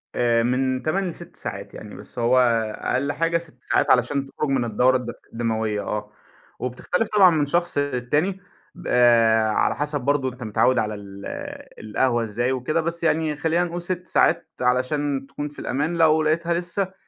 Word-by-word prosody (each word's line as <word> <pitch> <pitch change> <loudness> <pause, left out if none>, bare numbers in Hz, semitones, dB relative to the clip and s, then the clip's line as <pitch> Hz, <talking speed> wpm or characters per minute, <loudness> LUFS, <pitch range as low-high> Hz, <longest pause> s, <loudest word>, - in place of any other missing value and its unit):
آآ، 115 -1 +2
من 130 +1 0
8 190 +5 0
ل - - -6
6 - - -13
ساعات، - - -6
يعني - - -10
بس - - -9
هو 120 +2 +3 0.4
أقل 140 +3 -1
حاجة 165 +3 +1
6 155 -7 -11
ساعات - - +1
علشان 130 +3 +2
تخرج 135 +1 -4
من 130 -3 +1
الدورة 125 +3 +3
الد 120 -2 -6 0.2
الدموية، 110 -2 -1
آه، 105 0 -4 0.5
وبتختلف 125 - -2
طبعًا 200 -4 +6
من 155 -3 +1
شخص 175 +3 0
للتاني، 145 +7 0 0.4
ب - - -9
آآ، 115 -2 +4
على - - +1
حسب 150 -1 -2
برضه 140 0 +1
أنت 125 -1 -9
متعوّد 115 +4 +2
على 105 -1 -1
ال 100 -1 -10 0.5
القهوة 120 +2 0
إزاي 120 +4 -1
وكده، 130 +6 0
بس 170 +1 -3
يعني 160 -2 +1
خلينا 165 +3 +1
نقول 175 0 -4
6 180 +1 -4
ساعات 160 -1 +2
علشان 135 +2 0
تكون 145 +1 -5
في 145 - -11
الأمان، 150 +6 -2
لو 160 -1 +4
لقيتها 165 +2 +1
لسه 180 +2 -2
135 Hz, 175 wpm, -23 LUFS, 120-160 Hz, 0.5 s, طبعًا